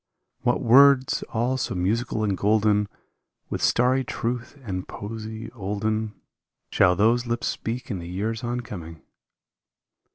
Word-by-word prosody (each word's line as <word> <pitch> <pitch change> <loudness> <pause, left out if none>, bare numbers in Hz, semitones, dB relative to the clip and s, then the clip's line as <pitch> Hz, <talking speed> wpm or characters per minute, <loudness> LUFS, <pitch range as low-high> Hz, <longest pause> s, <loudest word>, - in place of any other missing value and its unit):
What 125 -2 +1
words 130 +2 +6
all 120 +3 0
so 120 - -2
musical 110 +5 0
and 100 -2 +1
golden 105 +1 +2 0.6
With - - -2
starry 130 +2 +3
truth 120 +2 -4
and 95 -5 -4
poesy 110 +1 -7
olden 105 -1 -2 0.8
150 - - -11
Shall 90 -1 +5
those 115 +5 +3
lips 120 0 -1
speak 120 +3 -3
in 95 - -3
the 85 0 -7
years 110 +6 -3
on 120 +1 -2
coming? 85 -8 -9
115 Hz, 135 wpm, -25 LUFS, 100-120 Hz, 0.8 s, words